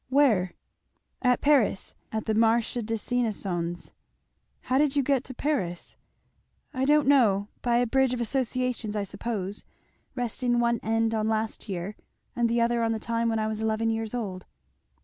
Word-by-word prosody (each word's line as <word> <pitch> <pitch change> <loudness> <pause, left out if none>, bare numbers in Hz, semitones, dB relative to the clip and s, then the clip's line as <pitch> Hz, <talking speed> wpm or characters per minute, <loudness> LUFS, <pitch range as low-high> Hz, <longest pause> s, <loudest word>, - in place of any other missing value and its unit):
"Where?" 240 -10 +3 0.7
"At 250 -1 +3
Paris 275 -9 +2 0.2
at 220 -1 -3
the 220 - 0
Marché 230 +2 +2
des 225 +1 -2 0.2
Innocens." 180 -7 -2 0.7
"How 260 +1 +1
did 290 -1 +2
you 280 - +3
get 270 -1 +1
to 260 - -8
Paris?" 215 - -2 0.8
"I 260 -1 0
don't 295 0 +4
know 210 -8 +4
by 240 -1 +2
a 245 - +3
bridge 265 +2 +2
of 250 - -2
associations, 250 -2 -1
I 205 - 0
suppose, 200 -1 -4 0.5
resting 245 0 0
one 235 -1 +2
end 225 0 +1
on 215 -1 0
last 220 0 -2
year, 190 +2 -4 0.4
and 235 -1 +2
the 235 0 +2
other 235 0 +2
on 225 0 +1
the 220 - -3
time 230 +1 -1
when 225 - 0
I 215 - 0
was 215 0 -3
eleven 220 +1 +1
years 225 +1 -3
old." 190 -6 -5
230 Hz, 170 wpm, -27 LUFS, 215-250 Hz, 0.8 s, don't